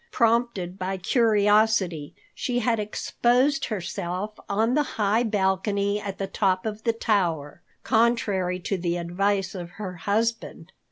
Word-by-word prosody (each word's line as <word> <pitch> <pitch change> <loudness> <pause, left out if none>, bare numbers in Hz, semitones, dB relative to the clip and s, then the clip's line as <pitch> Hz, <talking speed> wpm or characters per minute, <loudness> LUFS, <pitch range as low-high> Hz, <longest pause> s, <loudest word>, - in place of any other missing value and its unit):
Prompted 230 -6 +1
by 190 +1 -2
curiosity, 210 - +2 0.2
she 245 -1 -2
had 235 -1 +1
exposed 250 +6 +1
herself 195 -1 -4
on 220 +4 +1
the 300 - +3 0.2
high 210 +1 +2
balcony 200 -1 0
at 200 -2 -5
the 195 - -2
top 190 -1 0
of 215 0 -4
the 230 - +4
tower, 175 -10 -1 0.2
contrary 210 -6 +1
to 190 +1 -2
the 170 0 -1
advice 190 +3 -1
of 175 -3 -6
her 185 -4 -6
husband. 220 +6 -2
205 Hz, 130 wpm, -25 LUFS, 185-225 Hz, 0.2 s, the